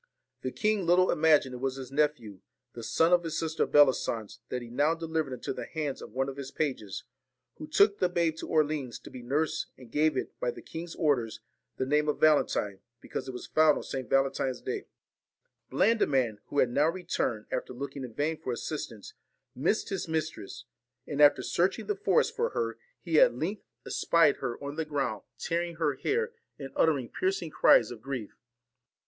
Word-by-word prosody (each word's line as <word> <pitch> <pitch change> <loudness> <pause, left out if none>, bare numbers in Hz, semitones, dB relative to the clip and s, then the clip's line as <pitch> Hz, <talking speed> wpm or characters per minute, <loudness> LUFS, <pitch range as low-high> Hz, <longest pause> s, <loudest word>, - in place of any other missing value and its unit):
The 130 - -2
king 210 +3 +1
little 180 +2 +5
imagined 150 -4 +4
it 125 - -6
was 135 0 -1
his 135 -1 -8
nephew, 140 -9 0 0.3
the 120 - -8
son 160 +9 +2
of 175 -1 +4
his 165 -1 -3
sister 160 -1 0
Bellisance, 120 -7 +3
that 125 -1 -3
he 120 - -10
now 145 +6 +2
delivered 160 -3 -2
into 125 - -4
the - - -6
hands 150 -4 -3
of - - -9
one 135 +3 -1
of 135 0 -6
his 135 -1 -6
pages, 130 -10 -3 0.5
who 155 - -7
took 200 +6 +4
the 180 - +2
babe 170 -2 +1
to - - -6
Orleans 150 -5 0
to - - -13
be 125 - -8
nursed, 145 +6 -1
and 125 -3 -14
gave 155 +1 +2
it, - - -2
by - - 0
the 475 - -7
king's 165 +1 -7
orders, 135 -9 0 0.4
the 130 - 0
name 150 +2 +2
of 150 - -1
Valentine, 125 -10 +3 0.2
because - - -6
it - - -3
was 125 - -7
found 155 -1 +4
on - - -5
S. - - -8 0.2
Valentine's 135 -1 +1
day. - - -4 0.8
Blandiman, 135 - +2
who - - -6
had 125 -3 +4
now 150 +5 +3
returned, 165 -11 -2
after 125 - -3
looking 135 +2 -6
in 120 -3 -8
vain 155 +2 0
for 130 - -3
assistance, 115 -4 -5 0.4
missed - - 0
his 195 -3 -3
mistress; 155 -9 -4 0.4
and 145 0 -2
after 145 0 +6
searching 180 +3 0
the 415 - -1
forest 425 +4 +2
for 470 +1 +1
her, 470 -2 -3 0.2
he - - +3
at - - +6
length 195 +6 -3 0.2
37 - - -4
VALEN 165 -2 +7
espied - - -20
her 120 +3 -4
on 140 +1 -5
the 160 - 0
ground, 140 -8 -2 0.2
tearing 170 0 -2
her 155 -3 +1
hair, 425 - 0
and 465 0 -8
TINE 460 - -13
AND - - -26
uttering 140 -7 +2
piercing 185 -4 -1
cries 115 -5 +5
of 115 -3 -9
grief. 130 -5 -5
150 Hz, 200 wpm, -29 LUFS, 130-165 Hz, 0.8 s, VALEN